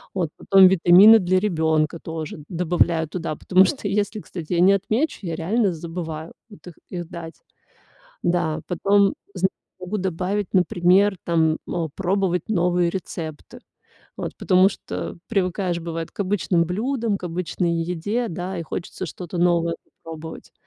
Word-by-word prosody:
Вот, 175 -5 0
потом 195 -1 +6
витамины 190 +5 +7
для 185 0 +2
ребёнка 160 -4 0
тоже 160 -2 -6
добавляю 170 -2 +1
туда, 165 -2 -4
потому 185 +4 +4
что 215 -1 -2
если, 205 +2 -1
кстати, 175 -3 -7
я 170 - +1
не 195 +2 +6
отмечу, 220 +10 0
я 170 -4 -4
реально 195 +3 +1
забываю 165 -1 -6 0.2
вот 205 - -16
их 175 - -9 0.2
их 175 -2 -5
дать. 165 -1 -8 0.9
Да, 170 -3 0
потом 200 +3 +2 0.2
зн 190 0 +2 0.3
могу 185 +3 -4
добавить, 190 +2 -2
например, 185 +2 +3
там, 160 -2 +1
э, 170 -3 -2
пробовать 190 -1 0
новые 175 -3 +2
рецепты. 160 -4 -7 0.6
Вот, - - -5
потому 185 +1 +4
что 90 - -6
привыкаешь 185 -3 -1
бывает 165 -1 -5
к - - -9
обычным 185 -3 +1
блюдам, 225 +4 -1
к - - -9
обычной 175 0 -2
еде, 205 +8 -2
да, 180 +3 -5
и 170 - -3
хочется 180 +3 -6
что-то 175 +2 -7
новое 170 -1 +2 0.3
попробовать. 160 0 -9
180 Hz, 145 wpm, -23 LUFS, 165-195 Hz, 0.9 s, витамины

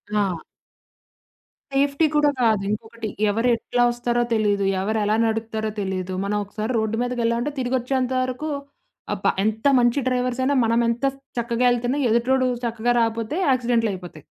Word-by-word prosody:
ఆ! 195 -4 +1 1.4
సేఫ్టీ 280 +3 +2
కూడా 295 0 +4
కాదు. 220 -4 +3
ఇంకొకటి, 220 +1 -5 0.2
ఎవరు 225 +4 +1
ఎట్లా 245 +1 -2
ఒస్తారో 240 0 -1
తెలీదు. 205 -3 +1 0.2
ఎవరెలా 210 +1 +1
నడుపుతారో 220 -1 -2
తెలీదు, 190 -1 -3
మనం 210 +1 0
ఒకసారి 215 +3 -4
రోడ్డు 220 0 -1
మీదకెళ్ళామంటే 240 +2 0
తిరిగొచ్చేంత 255 0 0
వరకు 255 +5 -4 0.6
ఆ - - -1
ప - - +5 0.2
ఎంత 220 +4 0
మంచి 240 +3 +3
డ్రైవర్స్ 250 0 0
అయినా 280 +2 +2
మనమెంత 235 +2 +1 0.3
చక్కగా 235 +1 0
ఎళ్తున్నా 245 +3 0
ఎదుటోడు 255 +3 +2 0.2
చక్కగా 235 0 0
రాకపోతే 230 +3 -1
యాక్సిడెంట్లు 240 -3 +2
అయిపోతాయి. 175 -5 -9
235 Hz, 135 wpm, -23 LUFS, 220-250 Hz, 1.4 s, ప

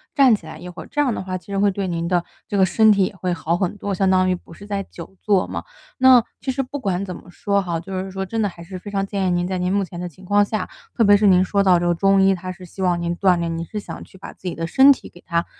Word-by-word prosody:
站 270 -4 +6
起 210 - -2
来 - - -9
一 180 - -9
会， 180 - -10
这 295 - 0
样 265 -5 +1
的 - - -4
话 185 0 -4
其 185 - -18
实 200 -1 -2
会 205 0 +4
对 195 0 -3
您 170 -1 -2
的 175 -1 +1 0.2
这 205 - -2
个 190 - +5
身 215 +3 +5
体 200 -1 +2
也 - - -5
会 180 -1 -2
好 170 0 -1
很 185 +1 -1
多， 205 0 -4
相 190 0 +1
当 185 0 +3
于 185 - +2
不 175 - -14
是 200 - -12
在 200 -1 -3
久 180 +1 -12
坐 200 -3 +2
嘛。 - - -5 0.3
那 255 -2 +7 0.2
其 265 - -6
实 265 +1 0
不 285 +3 -6
管 195 -5 -1
怎 185 -2 -5
么 180 - -12
说 200 +3 0
哈， 175 -3 -2
就 195 +3 -9
是 190 - -6
说 190 0 -4
真 225 +4 -2
的 210 - +2
还 170 -3 -9
是 185 +2 -8
非 205 - -9
常 195 -1 -1
建 195 -1 -2
议 - - +1
您， 175 0 0
在 185 +1 -2
您 180 0 -1
目 200 0 +2
前 175 -1 -8
的 180 - -4
情 175 +3 -15
况 205 +2 +3
下， 210 -2 -3 0.3
特 230 - +3
别 205 -1 +6
是 205 0 +3
您 185 -1 +5
说 200 +2 +1
到 185 -2 +5
这 175 - -1
个 175 - +3
中 195 +3 +3
医， 195 0 +5
他 185 0 -5
是 185 +1 -14
希 185 +2 -10
望 175 -2 +1
您 170 0 -1
锻 185 -2 +3
炼， 165 -1 -2
您 165 - -4
是 210 - -5
想 - - -8
去 - - -17
把 - - -9
自 185 - -10
己 175 - -3
的 165 - -3
身 265 +11 +6
体 - - -12
给 175 - -17
它 170 -1 0
190 Hz, 350 characters per minute, -21 LUFS, 180-205 Hz, 0.3 s, 那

